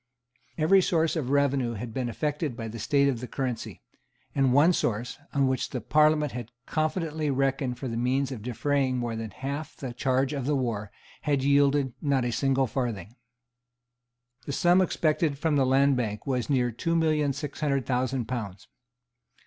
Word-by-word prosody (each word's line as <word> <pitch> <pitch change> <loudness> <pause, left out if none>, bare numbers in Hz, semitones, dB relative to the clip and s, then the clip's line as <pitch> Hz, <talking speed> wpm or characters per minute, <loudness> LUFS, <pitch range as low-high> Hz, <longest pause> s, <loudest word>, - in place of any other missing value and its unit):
Every 175 +5 +5
source 165 -2 +1
of 145 -6 -2
revenue 140 -4 +2
had 115 +1 -6
been 125 -1 -2
affected 145 - -2
by 115 -2 -4
the 115 +1 -7
state 140 +6 +2
of 130 -4 0
the 125 - -6
currency; 125 - -4 0.5
and 135 -2 +2
one 150 +7 +5
source, 120 -2 -2
on 140 -2 +2
which 130 0 -1
the 125 - -3
Parliament 150 +1 +3
had 120 -2 -6 0.2
confidently 155 -1 -1
reckoned 135 -2 0
for 130 - -5
the 115 - -3
means 130 +3 0
of 125 -5 -6
defraying 130 +3 0
more 120 -2 -2
than 110 -1 -4
half 140 +6 -5
the 130 -3 -6
charge 130 +3 0
of 140 -3 -3
the 150 - +2
war, 115 -6 -2 0.3
had 140 -3 0
yielded 140 -1 +3
not 140 -4 +1
a 120 - 0
single 135 +1 +1
farthing. 115 -4 -3 1.3
The 140 - -2
sum 175 +5 +4
expected 155 -4 +1
from 155 +1 0
the 135 -2 +3
Land 135 +1 +4
Bank 105 -3 -3
was 130 -2 -1
near 125 -3 +2
two 165 +9 -1
million 155 -3 +2
six 145 +2 -6
hundred 140 -4 0
thousand 130 -1 0
pounds. 105 -6 -5
135 Hz, 175 wpm, -27 LUFS, 125-145 Hz, 1.3 s, Every